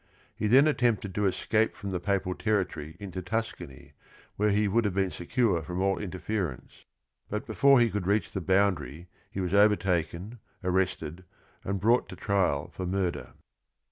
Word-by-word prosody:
He 105 - -1
then 130 +6 +6
attempted 120 -8 +1
to 105 +1 +1
escape 110 +3 +1
from 100 -1 -6
the 90 - -2
papal 95 -1 -1
territory 90 -8 -2
into 95 -2 -6
Tuscany 95 - -5 0.4
where 105 +1 +2
he 105 +1 +2
would 115 +4 +2
have 100 -3 -1
been 95 -2 +1
secure 100 -1 0
from 90 +4 -5
all 95 0 +1
interference, 95 - -4 0.4
but 105 +5 -3
before 140 -2 +5
he 120 -2 +3
could 100 -3 -3
reach 105 +2 +1
the 95 - -3
boundary 90 -4 0 0.2
he 95 - -4
was 90 0 -2
overtaken, 100 0 +2 0.2
arrested, 90 -2 -1 0.4
and 100 0 -2
brought 115 +6 +2
to - - -8
trial 95 -8 0
for 95 - -5
murder. 95 -1 -2
100 Hz, 160 wpm, -28 LUFS, 90-105 Hz, 0.4 s, then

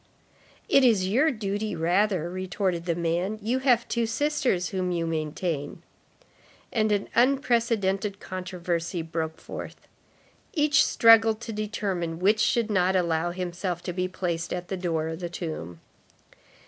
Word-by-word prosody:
—"It 275 - +5
is 215 -7 +4
your 265 +11 +3
duty 210 -4 -3
rather," 180 +1 +1
retorted 185 -1 -2
the 170 - +1
man, 175 +5 -1
"you 235 +5 -1
have 245 -3 +3
two 235 -1 0
sisters 265 -7 0
whom 185 -2 -2
you 170 -1 -1
maintain."—And 165 - -5
an 205 -1 0
unprecedented 230 -6 +1
controversy 175 -2 -3
broke 160 -1 -4
forth. - - -9 0.7
Each 300 -2 +4
struggled 225 -3 +5
to 230 -1 -6
determine 200 -6 -3
which 205 +5 +3
should 230 0 +2
not 190 -1 +2
allow 170 -2 +1
himself 175 0 -4
to 180 - -4
be 180 +1 -1
placed 170 -2 -3
at 180 0 -4
the 190 - -2
door 165 -3 -1
of 160 0 -5
the 175 -1 -4
tomb. 155 - -6
185 Hz, 135 wpm, -26 LUFS, 170-220 Hz, 0.7 s, It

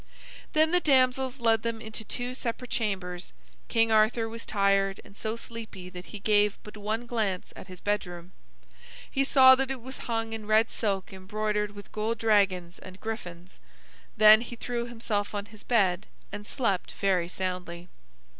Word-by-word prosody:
Then 315 +1 +4
the 360 - +5
damsels 260 -3 +2
led 225 -2 +3
them 230 0 -2
into 220 0 -5
two 245 +3 -3
separate 250 -1 -5
chambers. 185 - -2 0.3
King 225 -1 +2
Arthur 220 +1 +3
was 230 +1 -7
tired 195 -1 +2
and 200 - -16
so 220 +2 -3
sleepy 220 -6 -8
that 180 -1 -9
he 210 - -8
gave 205 0 +2
but 210 - -11
one 215 +3 -3
glance 215 -6 -2
at - - -10
his 185 -1 -10
bedroom. 180 -4 -3 0.8
He 275 - +2
saw 260 -1 +8
that 265 0 +1
it 270 -1 -3
was 260 +3 -8
hung 225 -1 -1
in 220 -2 -6
red 220 +1 +4
silk 195 -4 -2
embroidered 210 +2 -2
with 205 - -11
gold 220 +2 -1
dragons 195 -5 +2
and 185 0 -12
griffins. 180 -5 -7 0.6
Then 215 +1 +8
he 240 0 -7
threw 235 0 -3
himself 220 -3 -3
on 205 0 -3
his 215 0 -15
bed 195 -5 +2 0.2
and 205 0 -7
slept 200 -8 -1
very 185 -3 +1
soundly. 180 -2 -4
215 Hz, 165 wpm, -28 LUFS, 195-230 Hz, 0.8 s, saw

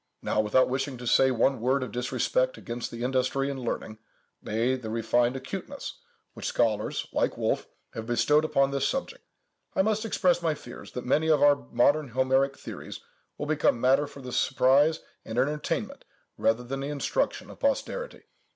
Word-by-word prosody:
Now, - - 0
without 110 +5 +3
wishing 135 +1 -2
to 125 - -8
say 130 +3 +5
one 130 0 +2
word 130 +2 +2
of 130 - -6
disrespect - - 0
against 120 0 -5
the 120 0 -6
industry 130 +2 0
and 135 - -5
learning—nay, 115 +1 -4
the 115 -4 -7
refined 120 +2 +1
acuteness—which 130 0 -8
scholars, 110 -3 0
like - - 0
Wolf, - - -1 0.3
have 110 0 -6
bestowed 120 +6 +3
upon 140 -3 +2
this 140 0 +1
subject, 470 - -3 0.5
I 190 - +4
must 215 +1 0
express 185 -5 +2
my 160 -2 +1
fears, 120 -4 -11
that 125 - -5
many 155 +5 +2
of 155 -2 +4
our 145 0 +7
modern 145 +5 +3
Homeric 130 +2 +1
theories - - -8 0.4
will - - -3
become 150 -5 +2
matter 135 +4 +3
for 140 - -12
the 125 - -6
surprise 135 +5 +3 0.2
and 110 +1 -6
entertainment, 150 +4 -1 0.3
rather 115 +2 +1
than 135 +3 -4
the 135 - -3
instruction, 150 - -1
of - - -14
posterity. - - -2
135 Hz, 165 wpm, -27 LUFS, 120-150 Hz, 0.5 s, our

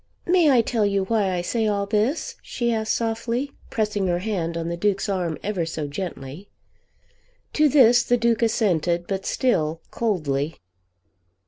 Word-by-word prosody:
"May 350 -3 +4
I 255 -4 +5
tell 225 -1 0
you 200 -1 +1
why 200 -1 +1
I 180 -1 -1
say 220 +5 -1
all 200 -1 0
this?" 215 +9 -1
she 235 -1 -2
asked 220 -1 0
softly, 230 +4 -2 0.2
pressing 210 -3 -1
her 175 -1 +1
hand 175 -4 -2
on 165 0 -3
the 170 - -2
Duke's 200 +2 0
arm 180 -5 -1
ever 200 -4 -1
so 160 -2 -4
gently. 145 +2 -7 1.0
To 305 0 +4
this 245 -4 +6
the 245 +1 +1
Duke 235 -1 +1
assented, 180 -7 +1
but 195 0 -3
still 165 - 0
coldly. 155 -9 -1
205 Hz, 155 wpm, -23 LUFS, 175-230 Hz, 1.0 s, this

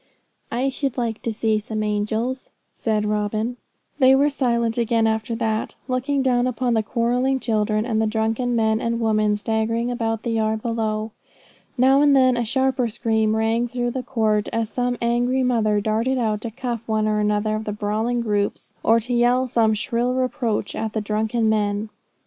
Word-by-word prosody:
'I 255 +3 0
should 270 -1 -3
like 230 -3 -2
to 230 - -2
see 220 0 0
some 215 0 -4
angels,' 220 +5 -2 0.2
said 215 -2 -1
Robin. 215 +3 -1 0.4
They 265 -1 +6
were 285 +2 +3
silent 235 -4 0
again 230 -1 +2
after 220 +1 -1
that, 220 -1 -2
looking 265 +2 0
down 250 -1 +2
upon 250 0 0
the 220 - +2
quarrelling 245 +4 0
children, 215 -2 0
and 220 -3 0
the 220 - +1
drunken 225 +3 0
men 220 -1 +1
and 230 0 -1
women 215 -2 +2
staggering 225 +3 -1
about 225 -2 -2
the 235 - -2
yard 220 -1 0
below. 220 -2 -2 0.7
Now 265 +3 +5
and 290 -1 +5
then 255 -2 +4
a 240 - 0
sharper 260 +1 +1
scream 220 -1 0
rang 225 +2 +1
through 240 0 -2
the 260 - -3
court, 220 -4 0
as 225 -1 -2
some 245 -1 -1
angry 245 +2 +1
mother 220 -4 +2
darted 225 +5 0
out 215 -4 0
to 230 - -4
cuff 235 0 -4
one 215 -1 +1
or 215 0 +1
another 210 +1 +1
of 215 0 -4
the 210 - -2
brawling 215 +3 -1
groups, 205 -3 -2
or 230 +1 +4
to 245 +3 -4
yell 245 +2 +3
some 230 -3 +2
shrill 235 +3 -1
reproach 250 -5 -1
at 220 -1 -3
the 220 - -1
drunken 220 +2 0
men. 210 0 0
225 Hz, 180 wpm, -22 LUFS, 215-245 Hz, 0.7 s, They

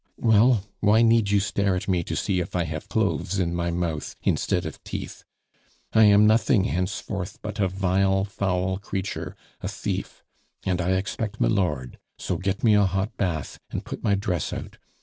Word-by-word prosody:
"Well, 110 -1 +4 0.2
why 110 +2 +4
need 115 -2 +4
you 100 0 +4
stare 100 -1 0
at 90 - -4
me 90 -3 +1
to - - -3
see 95 -2 0
if 90 +1 -4
I 90 - +2
have 75 -1 -6
cloves 100 -2 0
in 85 -2 0
my 85 0 -1
mouth 85 -3 -3
instead - - +1
of - - -7
teeth? - - -6 0.7
I 110 0 +7
am 105 0 +6
nothing 110 0 +4
henceforth 95 -1 -3
but 105 -1 -5
a 95 - +3
vile, 95 +1 +1
foul 95 -1 -1
creature, 95 -1 -4 0.3
a - - -3
thief - - -4 0.4
and 90 -1 0
I 90 +2 +1
expect 100 +3 -2
milord. 65 -2 0 0.2
So - - -2
get 95 +1 -2
me 110 -3 +5
a 105 -1 +5
hot 95 +3 -1
bath, 85 -7 -2
and - - -5
put - - -7
my 105 -3 +3
dress 90 -5 -2
out. - - -7
95 Hz, 180 wpm, -25 LUFS, 90-105 Hz, 0.7 s, I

